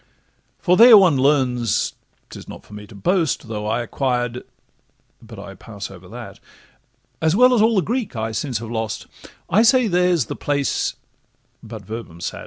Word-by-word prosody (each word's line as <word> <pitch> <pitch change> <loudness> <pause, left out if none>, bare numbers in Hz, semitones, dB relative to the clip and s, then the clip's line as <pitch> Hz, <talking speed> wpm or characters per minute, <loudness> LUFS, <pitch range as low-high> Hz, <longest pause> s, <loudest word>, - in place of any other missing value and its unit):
For 180 0 +2
there 235 -1 +9
one 185 -7 +5
learns—'tis 130 -4 -1
not - - -11
for - - -16
me 105 0 -10
to 105 - -15
boast, 160 - 0
Though 105 -1 -5
I 115 +3 -1
acquired—but 125 -1 -6
I - - -9
pass - - -9
over - - -13
that, - - -10 0.8
As 160 +2 +2
well 250 +3 +5
as 235 - +3
all 225 +1 +3
the 190 - +2
Greek 235 - -3
I 110 0 -3
since 125 +2 -3
have 115 +1 -7
lost: 110 -2 -4 0.4
I 205 - +3
say 245 +2 +4
that 190 -5 -1
there's 180 -6 +2
the - - -6
place—but 120 -5 -5
'Verbum 110 -6 -8
sat. 85 - -5
130 Hz, 165 wpm, -20 LUFS, 115-185 Hz, 0.8 s, there